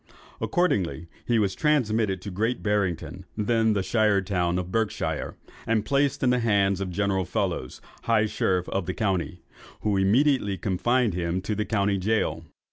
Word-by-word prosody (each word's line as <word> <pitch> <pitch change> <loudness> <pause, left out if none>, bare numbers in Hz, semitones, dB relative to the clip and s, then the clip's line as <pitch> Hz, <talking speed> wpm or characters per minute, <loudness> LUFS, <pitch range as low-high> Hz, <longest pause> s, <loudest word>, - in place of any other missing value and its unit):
Accordingly 90 - 0 0.2
he 120 - +3
was 100 -3 +1
transmitted 110 - +1
to 100 - -5
Great 110 +7 -1
Barrington, 95 -3 -1
then 110 +1 +2
the 100 -2 0
shire 105 +1 +2
town 90 -3 0
of 90 0 -4
Berkshire, 110 0 -2 0.3
and 110 -2 +1
placed 140 0 +1
in 125 - +4
the 125 - +2
hands 100 -4 +2
of 95 - -2
General 95 +1 0
Fellows, 65 -6 -3 0.2
high 110 -2 +3
sheriff 90 -3 0
of 95 -3 -2
the - - -2
county, 95 -4 -2 0.4
who 105 -2 +1
immediately 105 +1 +2
confined 115 +4 +1
him 85 +1 -1
in 105 - 0
the 105 +1 -1
county 100 -2 +1
gaol. 90 -5 0
100 Hz, 160 wpm, -26 LUFS, 95-115 Hz, 0.4 s, in